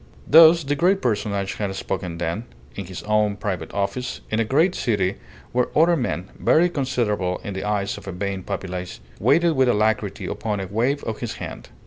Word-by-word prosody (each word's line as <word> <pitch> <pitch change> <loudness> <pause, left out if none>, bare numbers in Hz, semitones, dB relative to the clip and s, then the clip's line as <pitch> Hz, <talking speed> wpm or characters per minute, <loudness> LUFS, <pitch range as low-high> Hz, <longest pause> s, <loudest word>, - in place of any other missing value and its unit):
Thus 165 +1 +8
the 140 +1 0
great 185 +6 +3
personage 100 - -1
had 100 -2 -2
spoken 95 -3 -4
then, 85 +7 -3 0.3
in 100 - -6
his 90 0 -8
own 105 -1 +2
private 100 -2 -4
office, 120 +5 -3
in 110 - +1
a - - +3
great 155 - +2
city 100 - 0 0.3
where 125 0 +1
other 170 +2 +5
men 120 - -3
(very 175 +3 +4
considerable 120 - -1
in 100 - -5
the 95 - -4
eyes 100 -1 -1
of - - -16
a - - -3
vain 95 +1 -3
populace) 90 -1 -5 0.2
waited 160 - +4
with 130 -4 +3
alacrity 110 -2 0
upon 105 -2 -3
a 95 - -3
wave 120 +9 0
of 110 - -4
his 120 - -4
hand. - - -8
105 Hz, 185 wpm, -23 LUFS, 95-130 Hz, 0.3 s, Thus